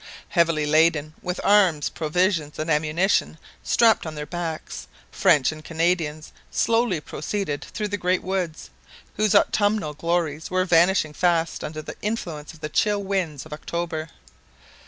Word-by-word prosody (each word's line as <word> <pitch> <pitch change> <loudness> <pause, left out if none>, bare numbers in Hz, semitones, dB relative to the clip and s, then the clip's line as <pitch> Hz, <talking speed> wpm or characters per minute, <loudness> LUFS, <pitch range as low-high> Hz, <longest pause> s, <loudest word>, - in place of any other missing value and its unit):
Heavily 165 -4 +2
laden, 155 0 +3
with 180 0 -3
arms, 185 -8 +4
provisions, 160 -1 0
and 155 +1 -2
ammunition 160 +3 +1 0.2
strapped 225 -7 +3
on 155 - -6
their 150 0 -5
backs, 165 0 -5 0.2
French 155 -9 +3
and 155 0 -10
Canadians 160 -2 -1 0.2
slowly 230 -6 +1
proceeded 150 +1 -4
through 210 -2 -4
the 205 - -2
great 180 +1 +1
woods, 180 -4 -3 0.5
whose 215 0 +2
autumnal 205 -5 +2
glories 165 -1 -1
were 185 0 +1
vanishing 175 -2 +3
fast 170 0 +1
under 155 0 -5
the - - -8
influence 170 -9 -4
of 160 - -17
the 150 - -3
chill 205 +5 +1
winds 180 -8 -2
of 155 - -9
October. 165 0 -4
165 Hz, 140 wpm, -24 LUFS, 155-190 Hz, 0.5 s, arms